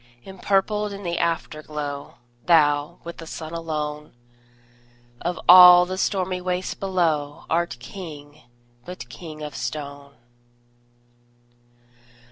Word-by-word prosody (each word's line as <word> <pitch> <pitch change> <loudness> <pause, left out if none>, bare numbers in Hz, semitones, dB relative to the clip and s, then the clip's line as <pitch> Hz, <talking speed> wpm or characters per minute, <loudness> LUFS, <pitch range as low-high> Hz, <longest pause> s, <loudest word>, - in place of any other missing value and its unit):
Empurpled 200 +2 0
in 200 0 -8
the 170 -1 -2
Afterglow, 150 -3 -4 0.3
Thou, 150 -1 +3
with 170 0 -8
the 165 - -10
Sun 160 0 -7
alone, 150 -3 -5 1.1
Of 175 +1 -3
all 180 0 +10
the 185 +1 -4
stormy 185 -1 -1
waste 180 0 -3
below, 160 -7 -1
Art 170 -4 0
King, 150 0 -10 0.4
but 180 -9 -9
king 155 +5 -9
of 150 -1 -6
stone! 140 -1 -6
165 Hz, 100 wpm, -23 LUFS, 150-180 Hz, 1.1 s, all